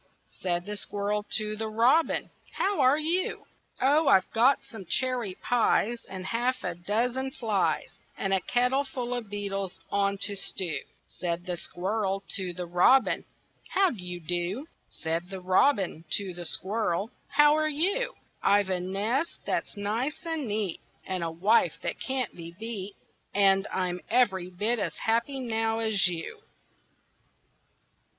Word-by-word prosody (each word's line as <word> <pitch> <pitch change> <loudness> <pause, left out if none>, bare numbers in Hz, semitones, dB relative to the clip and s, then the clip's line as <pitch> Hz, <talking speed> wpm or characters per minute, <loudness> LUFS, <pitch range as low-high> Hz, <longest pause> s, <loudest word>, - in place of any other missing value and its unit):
Said 175 -1 -1
the 210 0 -4
Squirrel 205 +1 -2
to 215 0 -2
the 220 +1 -2
Robin, 245 +9 +3 0.2
"How 400 -2 0
are 260 +2 +5
you?" 335 +4 0 0.3
"Oh, 290 +4 +4
I've 190 -1 +5
got 250 +5 +4
some 220 -4 -10
cherry 240 -1 0
pies, 235 0 +1
And 190 -1 -6
a - - -6
half 245 +2 0
a 180 - -1
dozen 235 +9 -1
flies, 220 -7 -1 0.2
And 195 0 0
a 190 - +2
kettle 250 +6 +2
full 250 -3 -4
of 240 -4 -4
beetles 195 -2 -3
on 200 0 +2
to 200 0 0
stew." 175 -5 -2 0.3
Said 175 -1 -4
the 180 -2 -2
Squirrel 195 +3 -2
to 185 -2 -1
the 175 +1 -5
Robin, 180 +9 +4 0.4
"How 385 -1 +3
d' 215 - -8
you 180 0 -5
do?" 175 - -2 0.2
Said 165 +2 -3
the 190 -1 -5
Robin 185 - +2
to 195 -3 -4
the 175 -1 -6
Squirrel, 200 +3 -1 0.2
"How 295 +1 +5
are 310 0 +2
you?" 380 +11 +1 0.3
"I've 200 -1 +3
a 185 - +1
nest 210 - -1
that's - - -2
nice 230 - -2
and 320 -5 -2
neat, 205 -4 -2 0.2
And 185 -2 -2
a 165 - -1
wife 190 +8 +3
that - - -3
can't 260 -4 -2
be 170 -1 -8
beat, 210 -3 -5 0.4
And 195 -1 +5
I'm 180 -1 -1
every 190 -7 +2
bit 215 +6 0
as - - -2
happy 235 +5 0
now 225 -2 0
as 220 -5 +3
you." 180 - -4
205 Hz, 155 wpm, -28 LUFS, 185-250 Hz, 0.4 s, are